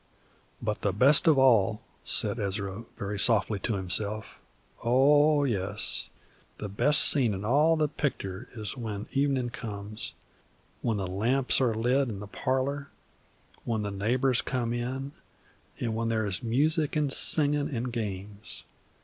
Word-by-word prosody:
"But 105 -2 -2
the 100 - 0
best 140 - +5
of 155 -3 +5
all," 115 -4 +3 0.2
said 105 +2 +1
Ezra, 100 +1 -3
very 100 0 -4
softly 105 -2 +2
to 110 +3 -2
himself, 100 +3 -3 0.4
"oh, 145 +5 +4
yes, 100 -5 -1 0.5
the 105 - -5
best 140 +9 +4
scene 120 -8 +4
in 95 +2 -6
all 150 +7 +3
the 155 -1 +2
pictur' 130 -8 -4
is 105 0 -5
when 110 -5 -5
evenin' 135 -3 0
comes, 105 -1 -6 0.7
when 115 -3 -1
the 100 - -2
lamps 120 +10 +1
are 120 -4 +2
lit 125 +4 +1
in 100 -3 -6
the 105 - -7
parlor, 135 +6 -2 0.7
when 110 -3 -2
the 105 - -3
neighbors 120 +6 +1
come 120 -3 -2
in, 130 +3 -4 0.7
and 115 -2 -2
when 115 0 -1
there 110 -1 0
is 100 +1 -2
music 150 +6 +1
an' 145 -2 0
singin' 145 0 +2
an' 120 -4 -3
games. 105 -2 -6
115 Hz, 145 wpm, -28 LUFS, 105-135 Hz, 0.7 s, best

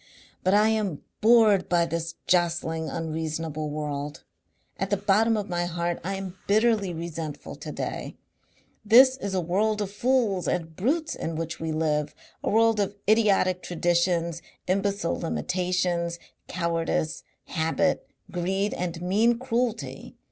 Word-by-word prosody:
"But 185 +2 +4
I 210 +1 +5
am 210 -8 -1 0.2
bored 215 -4 +5
by 170 -1 +3
this 165 0 -3
jostling 170 -2 +1
unreasonable 160 -1 -3
world. 145 -1 -4 0.6
At 195 - -1
the 205 - +2
bottom 210 +3 +3
of 205 -1 -3
my 175 -1 -1
heart 175 0 -2
I 195 +3 -2
am 190 -1 -7
bitterly 215 -2 +3
resentful 165 -3 -6
to - - -7
day. - - -4 0.7
This 255 +5 +7
is 200 -6 -3
a - - +2
world 205 +5 +1
of 200 -2 -2
fools 210 -5 +1
and 165 -2 -2
brutes 310 - 0
in 165 - -4
which 165 +1 -4
we 160 0 -2
live, 155 -2 0 0.3
a - - 0
world 225 0 +4
of 200 0 0
idiotic 200 -4 +3
traditions, 170 -1 0 0.2
imbecile 195 -1 0
limitations, 180 0 -1 0.3
cowardice, 165 -2 -1 0.2
habit, 165 +4 0 0.2
greed 190 +3 -1
and 170 -1 -4
mean 220 +6 +3
cruelty. 235 -2 -2
180 Hz, 135 wpm, -26 LUFS, 165-205 Hz, 0.7 s, This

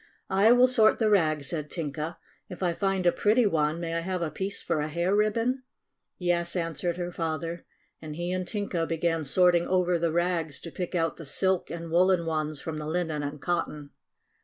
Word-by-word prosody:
"I 200 +4 +5
will 245 +1 +7
sort 230 -4 +4
the 220 -2 +2
rags," 155 -7 +2
said 150 +1 -2
Tinka. 155 0 -4 0.3
"If 180 - -7
I 175 -2 +2
find 195 0 -1
a 175 - +6
pretty 220 +6 +3
one, 155 -4 +1
may 165 -1 -3
I 165 - 0
have 180 +1 -2
a 155 - -2
piece 195 +6 -4
for 165 -3 -1
a 150 - -1
hair 170 +5 0
ribbon?" 230 +5 +1 0.6
"Yes," 175 -1 0
answered 170 0 -2
her 175 0 -3
father, 165 0 -4 0.3
and 155 -1 -7
he 175 +2 -3
and 185 -1 -2
Tinka 195 -6 -2
began 165 0 0
sorting 175 +4 +3
over 180 -2 +2
the 165 -1 +1
rags 170 -2 0
to 165 - -8
pick 180 +2 -4
out 165 -1 0
the 165 - -9
silk 190 +5 +1
and 165 -1 -6
woolen 180 0 +3
ones 155 -2 -1
from 155 +4 -5
the 150 - -5
linen 160 -2 -1
and 145 +1 -5
cotton. 150 -4 -3
170 Hz, 200 wpm, -27 LUFS, 160-185 Hz, 0.6 s, will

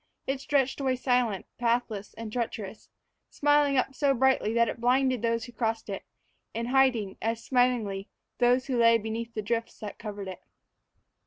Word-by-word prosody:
It 270 0 -2
stretched 275 -1 +1
away 260 -1 +1
silent, 245 -6 0
pathless, 230 -4 -1
and 225 -1 -7
treacherous, 225 -4 -4 0.4
smiling 290 -1 +3
up 265 +1 +1
so 275 0 +2
brightly 260 -3 +2
that 235 0 +4
it 230 - -5
blinded 255 0 +2
those 230 -1 0
who 245 - -11
crossed 225 -2 -2
it; 195 - -5 0.5
and 235 +1 -2
hiding, 250 -7 +2
as 225 +1 -2
smilingly, 240 -6 +1 0.3
those 250 +2 +3
who 255 -3 -1
lay 230 0 +6
beneath 230 +1 -5
the 215 - -2
drifts 230 +2 -2
that 210 -1 -7
covered 205 -3 -6
it. 185 -1 -7
235 Hz, 165 wpm, -28 LUFS, 220-255 Hz, 0.5 s, lay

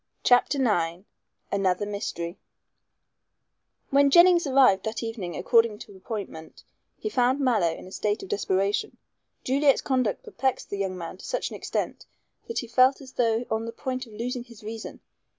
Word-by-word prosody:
CHAPTER 245 +3 +4
IX 175 -9 0 0.5
ANOTHER 195 0 +1
MYSTERY 195 -4 -4 1.5
When 280 +1 +5
Jennings 345 +1 +6
arrived 260 -8 +5
that 220 +2 -3
evening 210 -7 -5
according 230 -3 +3
to 210 -2 -12
appointment, 190 -5 -7 0.3
he - - -5
found 255 -7 +2
Mallow 225 -11 +2
in - - -9
a 185 - -12
state 210 - -1
of 390 - -9
desperation. 200 - 0 0.5
Juliet's 275 +1 +3
conduct 255 -6 0
perplexed 265 -1 -2
the 200 - -3
young 190 -2 -2
man 170 +1 -7
to - - -12
such - - -2
an - - -6
extent - - -4 0.4
that 460 - -5
he 240 - -2
felt 255 +3 +4
as 265 -2 -12
though 230 0 +1
on 220 +1 -1
the - - -4
point 255 0 -4
of 220 - -15
losing 240 +3 -4
his 235 -3 -15
reason. 220 +1 -7
230 Hz, 165 wpm, -26 LUFS, 200-260 Hz, 1.5 s, Jennings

